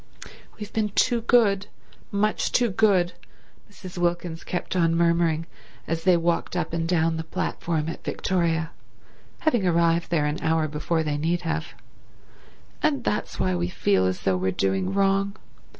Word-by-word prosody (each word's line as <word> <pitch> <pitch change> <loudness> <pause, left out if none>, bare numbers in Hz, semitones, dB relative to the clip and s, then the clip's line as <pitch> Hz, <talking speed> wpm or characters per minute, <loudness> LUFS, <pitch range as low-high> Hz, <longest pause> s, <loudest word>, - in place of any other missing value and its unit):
"We've 210 -1 -8
been 215 -1 0
too 235 +3 +2
good—much 210 -2 0
too 240 -3 +2
good," 185 -3 +3 0.6
Mrs. 185 -3 -9
Wilkins 175 -1 -1
kept 180 - -4
on 165 -2 +3
murmuring 170 -1 +2 0.4
as 165 +1 -3
they 180 -2 +5
walked 170 +1 -1
up 165 -2 -2
and 165 0 -1
down 165 -2 +1
the 160 - -3
platform 160 -2 -2
at 165 - -6
Victoria, 165 -3 -1 0.7
having 240 -12 +2
arrived 170 -1 +2
there 155 -4 +1
an 150 0 -2
hour 160 -1 +1
before 160 +2 -1
they 150 -2 -1
need 170 +3 0
have, 160 -1 -3 1.1
"and 285 -5 +1
that's 210 - -2
why 95 - +1
we 85 -1 -1
feel 95 0 +2
as 95 +1 -2
though 95 -1 +1
we're 95 +1 0
doing 95 0 0
wrong. 195 0 +1
170 Hz, 150 wpm, -25 LUFS, 160-195 Hz, 1.1 s, they